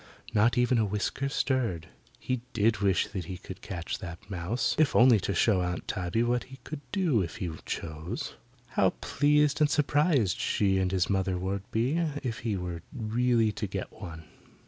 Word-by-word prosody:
Not 115 Hz, +4 st, +3 dB
even 125 Hz, 0 st, +3 dB
a 110 Hz, -, +3 dB
whisker 105 Hz, +7 st, -1 dB
stirred. 125 Hz, -, 0 dB, 0.3 s
He 130 Hz, -2 st, -2 dB
did 110 Hz, -1 st, +2 dB
wish 95 Hz, -3 st, +2 dB
he 90 Hz, -1 st, -5 dB
could -, -, -10 dB
catch 85 Hz, -3 st, -4 dB
that 85 Hz, +3 st, -9 dB
mouse, 100 Hz, +8 st, 0 dB
if 155 Hz, -4 st, +3 dB
only 120 Hz, -3 st, +7 dB
to 100 Hz, 0 st, -2 dB
show 95 Hz, 0 st, +3 dB
Aunt 90 Hz, -1 st, -3 dB
Tabby 95 Hz, +4 st, 0 dB
what 120 Hz, 0 st, 0 dB
he 135 Hz, 0 st, -12 dB
could 150 Hz, +2 st, -6 dB
do 170 Hz, -, +2 dB
if 85 Hz, -, -4 dB
he 90 Hz, -7 st, -3 dB, 0.2 s
chose. 80 Hz, +7 st, -4 dB, 0.4 s
How 95 Hz, -4 st, +2 dB
pleased 150 Hz, +1 st, +2 dB
and 150 Hz, -, +5 dB
surprised 145 Hz, -, +2 dB
she 95 Hz, -2 st, +2 dB
and 95 Hz, -1 st, +1 dB
his 95 Hz, -2 st, +1 dB
mother 95 Hz, -2 st, 0 dB
would 95 Hz, +2 st, -3 dB
be 125 Hz, +9 st, +1 dB, 0.2 s
if 115 Hz, -4 st, -3 dB
he 110 Hz, -4 st, -1 dB
were 90 Hz, -2 st, -4 dB
really 115 Hz, -1 st, +1 dB
to 105 Hz, -, -4 dB
get 95 Hz, 0 st, -5 dB
one. 85 Hz, -6 st, -9 dB
105 Hz, 175 wpm, -29 LUFS, 95-125 Hz, 0.4 s, only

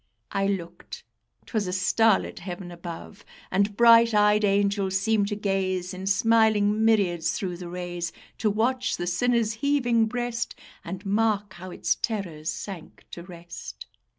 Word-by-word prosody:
I 195 Hz, 0 st, 0 dB
looked; 185 Hz, -4 st, -5 dB, 0.4 s
'twas 215 Hz, -5 st, -2 dB
a -, -, -2 dB
starlit 195 Hz, +3 st, +2 dB
heaven 180 Hz, 0 st, -7 dB
above! 175 Hz, +5 st, -9 dB, 0.3 s
And 200 Hz, +2 st, +1 dB
bright 230 Hz, -1 st, +6 dB
eyed 210 Hz, 0 st, +4 dB
angels 200 Hz, -1 st, +1 dB
seemed 210 Hz, 0 st, +1 dB
to 205 Hz, -, -2 dB
gaze 190 Hz, -3 st, -1 dB
In 190 Hz, +1 st, -6 dB
smiling 215 Hz, 0 st, +3 dB
myriads 190 Hz, -7 st, +2 dB
through 180 Hz, -3 st, -4 dB
the 175 Hz, -1 st, -8 dB
rays; 175 Hz, -1 st, -4 dB, 0.3 s
To 215 Hz, -, +2 dB
watch 250 Hz, +5 st, 0 dB
the 175 Hz, -, -3 dB
sinner's 230 Hz, +5 st, +1 dB
heaving 240 Hz, -3 st, +1 dB
breast, 240 Hz, 0 st, -3 dB, 0.3 s
And 190 Hz, +2 st, -7 dB
mark 205 Hz, -1 st, 0 dB
how 185 Hz, +1 st, -9 dB
its -, -, 0 dB
terrors 175 Hz, -8 st, -4 dB
sank 190 Hz, -6 st, -9 dB
to 170 Hz, -, -7 dB
rest. 170 Hz, -, -10 dB
200 Hz, 145 wpm, -26 LUFS, 180-220 Hz, 0.4 s, bright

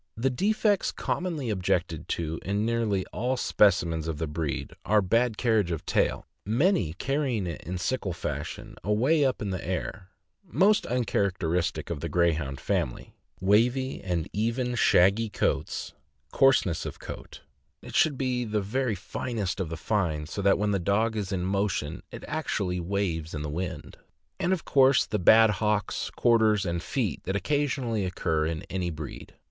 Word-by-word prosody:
The 130 Hz, +4 st, +1 dB
defects 205 Hz, -, +1 dB
commonly 160 Hz, -10 st, -2 dB
objected 90 Hz, -4 st, -1 dB
to 80 Hz, -1 st, -2 dB
in 100 Hz, +2 st, -1 dB
nearly 110 Hz, -5 st, 0 dB
all 125 Hz, +4 st, -1 dB
specimens 85 Hz, -8 st, +2 dB
of 80 Hz, -2 st, -3 dB
the 80 Hz, -, -2 dB
breed 75 Hz, -1 st, -3 dB
are 105 Hz, 0 st, +3 dB
bad 115 Hz, +4 st, +1 dB
carriage 110 Hz, -7 st, +2 dB
of 85 Hz, -3 st, -4 dB
tail, -, -, +1 dB, 0.2 s
many 115 Hz, -, +2 dB
carrying 130 Hz, -, -1 dB
it 85 Hz, -3 st, -5 dB
in 90 Hz, +2 st, -4 dB
sickle 95 Hz, +2 st, -1 dB
fashion 75 Hz, -3 st, -5 dB
away 125 Hz, -, +3 dB
up 130 Hz, -5 st, 0 dB
in 100 Hz, -, -2 dB
the 95 Hz, -, -4 dB
air 95 Hz, +1 st, -4 dB, 0.2 s
— -, -, -52 dB
most 195 Hz, +3 st, +3 dB
un 125 Hz, +1 st, 0 dB
characteristic 90 Hz, -5 st, -1 dB
of 80 Hz, -, -3 dB
the 85 Hz, -, -4 dB
Greyhound 80 Hz, -6 st, +1 dB
family; -, -, -2 dB, 0.3 s
wavy 120 Hz, +7 st, +2 dB
and 90 Hz, -4 st, -1 dB
even 115 Hz, +4 st, 0 dB
shaggy 110 Hz, -1 st, +4 dB
coats, -, -, -1 dB, 0.4 s
coarseness 135 Hz, -, +3 dB
of -, -, -6 dB
coat -, -, -9 dB, 0.4 s
(it -, -, -10 dB
should 145 Hz, -4 st, +3 dB
be 125 Hz, -2 st, 0 dB
the 110 Hz, -2 st, -1 dB
very 115 Hz, +3 st, -1 dB
finest 100 Hz, 0 st, -3 dB
of 90 Hz, -4 st, -2 dB
the 80 Hz, -, -5 dB
fine, 80 Hz, -5 st, -1 dB
so 90 Hz, +6 st, -5 dB
that 100 Hz, 0 st, +4 dB
when 105 Hz, 0 st, 0 dB
the 100 Hz, -, +1 dB
dog 110 Hz, +5 st, +1 dB
is 100 Hz, -2 st, -3 dB
in 90 Hz, -2 st, -1 dB
motion 95 Hz, -4 st, -1 dB
it -, -, -9 dB
actually 100 Hz, -, -2 dB
waves 85 Hz, -4 st, -2 dB
in 75 Hz, -, -4 dB
the 75 Hz, -, -3 dB
wind), 85 Hz, -1 st, -5 dB, 0.4 s
and 180 Hz, -, +1 dB
of 190 Hz, -3 st, -1 dB
course 135 Hz, -1 st, +5 dB
the 105 Hz, -, -2 dB
bad 110 Hz, +4 st, +7 dB
hocks, 105 Hz, 0 st, -1 dB
quarters, 110 Hz, -4 st, +3 dB
and 85 Hz, -1 st, -1 dB
feet 110 Hz, -, -2 dB
that 95 Hz, -, -1 dB
occasionally 130 Hz, -3 st, 0 dB
occur 80 Hz, -4 st, 0 dB
in 80 Hz, -1 st, -3 dB
any 90 Hz, -2 st, -2 dB
breed. 75 Hz, -3 st, -8 dB
100 Hz, 165 wpm, -27 LUFS, 85-120 Hz, 0.4 s, bad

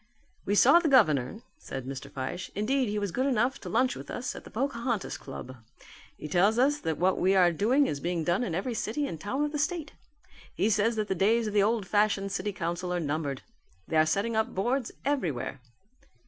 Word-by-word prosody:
"We 205 Hz, -, +2 dB
saw 275 Hz, +10 st, +7 dB
the 335 Hz, -3 st, 0 dB
governor," 155 Hz, -, +3 dB, 0.2 s
said 130 Hz, -, -6 dB
Mr. 135 Hz, 0 st, -6 dB
Fyshe. 135 Hz, +7 st, -5 dB
"Indeed 245 Hz, +4 st, +1 dB
he 210 Hz, -, -2 dB
was 200 Hz, -3 st, -2 dB
good 260 Hz, +7 st, 0 dB
enough 255 Hz, 0 st, +1 dB
to -, -, -7 dB
lunch 250 Hz, +2 st, +2 dB
with -, -, -9 dB
us 250 Hz, +1 st, -4 dB
at -, -, -10 dB
the -, -, -10 dB
Pocahontas 235 Hz, -3 st, -2 dB
Club. 130 Hz, -1 st, -9 dB, 0.6 s
He -, -, -7 dB
tells 190 Hz, +8 st, +3 dB
us 285 Hz, +4 st, +3 dB
that 160 Hz, -, -2 dB
what 185 Hz, +2 st, +2 dB
we 190 Hz, +2 st, +3 dB
are 180 Hz, -2 st, +5 dB
doing 240 Hz, -, +3 dB
is 145 Hz, -, -2 dB
being 170 Hz, +1 st, -2 dB
done 175 Hz, +8 st, +1 dB
in 175 Hz, -9 st, -2 dB
every 215 Hz, +7 st, -2 dB
city 230 Hz, +6 st, -2 dB
and 165 Hz, -, -6 dB
town 265 Hz, +8 st, -1 dB
of 295 Hz, -, -3 dB
the 300 Hz, -, -3 dB
state. 315 Hz, 0 st, -2 dB, 0.6 s
He 220 Hz, -, +1 dB
says 220 Hz, +3 st, +2 dB
that 215 Hz, -1 st, -1 dB
the -, -, 0 dB
days 220 Hz, +5 st, +2 dB
of 210 Hz, -, -3 dB
the 205 Hz, -, +4 dB
old 215 Hz, 0 st, +1 dB
fashioned 205 Hz, 0 st, +1 dB
city 205 Hz, -, -2 dB
council 180 Hz, -1 st, -3 dB
are 180 Hz, -, 0 dB
numbered. 145 Hz, -3 st, -3 dB, 0.4 s
They 160 Hz, -, 0 dB
are 155 Hz, 0 st, +5 dB
setting 200 Hz, +8 st, 0 dB
up 220 Hz, 0 st, 0 dB
boards 240 Hz, +6 st, 0 dB
everywhere." 165 Hz, -, -2 dB
205 Hz, 215 wpm, -28 LUFS, 175-245 Hz, 0.6 s, saw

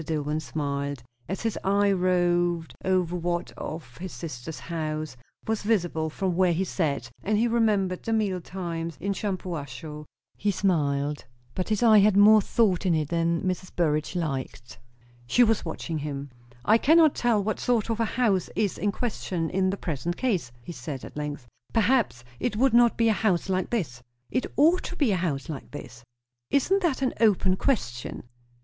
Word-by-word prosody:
Dillwyn 150 Hz, -1 st, -2 dB
smiled, 140 Hz, -3 st, -3 dB, 0.3 s
as 190 Hz, -, -3 dB
his 225 Hz, -2 st, -1 dB
eye 200 Hz, +1 st, +3 dB
roved 175 Hz, -2 st, +1 dB
over 180 Hz, -2 st, +1 dB
what 175 Hz, 0 st, -2 dB
of 150 Hz, -6 st, -7 dB
his 185 Hz, +2 st, -6 dB
sister's 155 Hz, -2 st, -7 dB
house 155 Hz, -3 st, -4 dB, 0.3 s
was 220 Hz, -1 st, -1 dB
visible 175 Hz, -7 st, 0 dB
from 185 Hz, +2 st, -2 dB
where 180 Hz, -1 st, +3 dB
he 175 Hz, +4 st, 0 dB
sat, 145 Hz, -10 st, -2 dB
and 210 Hz, +1 st, +1 dB
he 230 Hz, +3 st, +3 dB
remembered 210 Hz, -6 st, +1 dB
the 225 Hz, -, -4 dB
meal 205 Hz, -5 st, 0 dB
times 170 Hz, -3 st, -5 dB
in 200 Hz, +3 st, -1 dB
Shampuashuh; 160 Hz, -, -5 dB, 0.3 s
he 210 Hz, -, -1 dB
smiled, 150 Hz, -7 st, 0 dB, 0.3 s
but 185 Hz, -, -3 dB
his 215 Hz, +1 st, +1 dB
eye 220 Hz, -2 st, +7 dB
had 200 Hz, 0 st, +4 dB
more 215 Hz, +1 st, +8 dB
thought 195 Hz, -4 st, +1 dB
in 180 Hz, -4 st, +2 dB
it 155 Hz, -2 st, -1 dB
than 170 Hz, 0 st, 0 dB
Mrs. 185 Hz, 0 st, -3 dB
Burrage 155 Hz, 0 st, 0 dB
liked. 135 Hz, -7 st, -4 dB, 0.5 s
She 245 Hz, -, +5 dB
was 225 Hz, -2 st, +2 dB
watching 160 Hz, -3 st, -4 dB
him. 140 Hz, -2 st, -5 dB, 0.3 s
"I 220 Hz, +2 st, +5 dB
cannot 315 Hz, +2 st, +5 dB
tell 230 Hz, -4 st, +1 dB
what 215 Hz, +1 st, -2 dB
sort 230 Hz, -2 st, +1 dB
of 225 Hz, -, -2 dB
a 230 Hz, -, +2 dB
house 215 Hz, -6 st, +1 dB
is 205 Hz, -4 st, 0 dB
in 205 Hz, +4 st, +1 dB
question 185 Hz, -7 st, -3 dB
in 190 Hz, +1 st, +1 dB
the 195 Hz, -, -2 dB
present 170 Hz, +1 st, -3 dB
case," 195 Hz, -, 0 dB
he 175 Hz, -, -7 dB
said 135 Hz, -2 st, -6 dB
at -, -, -11 dB
length. 150 Hz, -3 st, -4 dB, 0.3 s
"Perhaps 225 Hz, -, +2 dB, 0.2 s
it -, -, -1 dB
would 255 Hz, +2 st, +3 dB
not 235 Hz, 0 st, +5 dB
be 230 Hz, -, +3 dB
a 220 Hz, -, +4 dB
house 195 Hz, -4 st, 0 dB
like 185 Hz, -1 st, 0 dB
this." 150 Hz, -, -2 dB, 0.3 s
"It 255 Hz, -, 0 dB
ought 330 Hz, +6 st, +5 dB
to -, -, -5 dB
be 280 Hz, -10 st, +2 dB
a 190 Hz, -, +2 dB
house 150 Hz, -7 st, -2 dB
like 150 Hz, -4 st, -7 dB
this." 120 Hz, -4 st, -10 dB, 0.5 s
"Isn't 380 Hz, +8 st, +2 dB
that 300 Hz, -7 st, 0 dB
an 260 Hz, -, +1 dB
open 195 Hz, -4 st, +4 dB
question?" 120 Hz, -, -2 dB
180 Hz, 180 wpm, -26 LUFS, 155-215 Hz, 0.5 s, more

